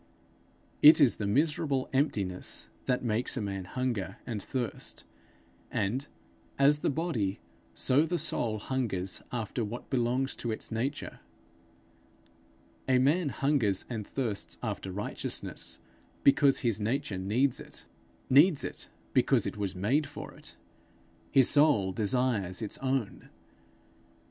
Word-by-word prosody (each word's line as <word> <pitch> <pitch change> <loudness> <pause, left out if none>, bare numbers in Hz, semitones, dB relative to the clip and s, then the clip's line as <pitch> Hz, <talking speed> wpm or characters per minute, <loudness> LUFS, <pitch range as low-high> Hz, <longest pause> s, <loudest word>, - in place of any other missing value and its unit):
It 155 +3 +9
is 140 -6 +5
the 100 - -2
miserable 145 +2 +1
emptiness 100 -10 -1 0.2
that 125 -1 0
makes 120 +3 0
a - - 0
man 95 -2 -4
hunger 105 -4 -3
and 110 -4 -4
thirst; 125 +2 -4 0.7
and, 125 +9 -1 0.5
as 145 +2 +4
the - - 0
body, 135 - -1 0.4
so 145 +5 +3
the 175 - 0
soul 120 -8 -1
hungers 105 -6 -2
after 120 0 -2
what 115 +5 -6
belongs 130 +1 0
to 120 - -3
its 110 - -3
nature. 130 +6 -3 1.7
A 130 - +5
man 145 +5 +3
hungers 135 -9 +1
and 110 -4 -4
thirsts 115 -7 -3
after 95 - -3
righteousness 105 +3 -3 0.5
because 140 0 +5
his 115 -5 0
nature 115 -3 -1
needs 120 +8 +1
it - - -11 0.4
needs 145 +4 +5
it - - -6 0.2
because - - +3
it - - -3
was 100 -2 -3
made 125 +11 +1
for - - -8
it; - - -11 0.7
his 135 -3 +5
soul 145 -11 +4
desires 105 -3 0
its 110 -3 -4
own. 130 -5 -2
125 Hz, 125 wpm, -30 LUFS, 105-140 Hz, 1.7 s, It